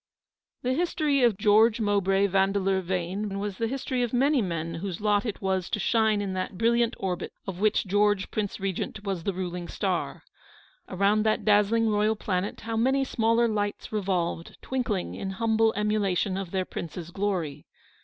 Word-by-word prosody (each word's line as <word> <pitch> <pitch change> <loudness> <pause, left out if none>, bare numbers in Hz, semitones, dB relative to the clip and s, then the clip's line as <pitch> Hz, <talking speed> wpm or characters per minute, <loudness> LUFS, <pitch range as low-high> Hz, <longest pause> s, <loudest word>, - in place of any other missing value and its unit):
The 255 +1 +1
history 305 -3 +1
of 235 -5 +3
George 220 +2 +4
Mowbray 200 -2 +2
Yandeleur 195 0 +1
Vane 190 +3 -3
was 200 -1 -4
the 230 - +1
history 255 0 -2
of 240 -1 -1
many 275 +2 +3
men 165 -4 -3
whose 175 +1 -4
lot 210 +1 +1
it 210 - -5
was 190 -2 0
to - - -1
shine 220 0 +2
in 195 -2 -3
that 185 0 -4
brilliant 235 +2 +2
orbit, 185 -2 -3
of 185 -2 -5
which 215 +1 +2
George, 205 0 +1
Prince 210 -2 -3
Regent, 195 +1 -3
was 195 -5 -3
the 200 - +1
ruling 180 -1 -4
star. - - -2 0.7
Around 200 +3 +2
that 215 - +1
dazzling 215 +2 +4
royal 210 +1 +2
planet 195 -2 -2
how 225 0 -4
many 265 +4 +2
smaller 230 -2 +2
lights 205 -2 -2
revolved, 180 -5 -2
twinkling 245 -8 -2
in 195 - -4
humble 225 -1 +3
emulation 205 -2 0
of 195 -2 -4
their 185 0 -1
prince's 170 0 -7
glory. 185 -7 -2
205 Hz, 165 wpm, -27 LUFS, 190-225 Hz, 0.7 s, George